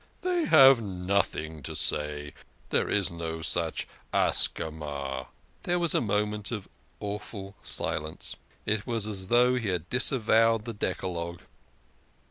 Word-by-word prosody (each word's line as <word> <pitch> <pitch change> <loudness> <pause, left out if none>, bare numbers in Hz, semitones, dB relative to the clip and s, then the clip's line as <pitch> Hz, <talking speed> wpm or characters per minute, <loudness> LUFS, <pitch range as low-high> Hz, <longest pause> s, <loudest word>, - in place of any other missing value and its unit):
"They 360 -2 0
have 135 - +7
nothing 90 -5 -2
to - - -7
say. 75 -1 0 0.4
There - - +1
is 100 -4 +1
no 80 -1 -5
such - - +1 0.2
Ascama" 70 -4 0 0.3
There 175 0 0
was 170 -3 +2
a - - +2
moment 105 -2 -1
of 105 -5 -5 0.3
awful 100 -1 -6
silence. 80 +1 -2 0.3
It 110 +1 -1
was 115 -4 0
as 100 -3 -4
though 125 +3 +4
he 115 -3 -2
had 90 -2 -2
disavowed 115 -3 +4
the 115 - -5
Decalogue. 85 -4 -3
100 Hz, 125 wpm, -28 LUFS, 80-115 Hz, 0.4 s, have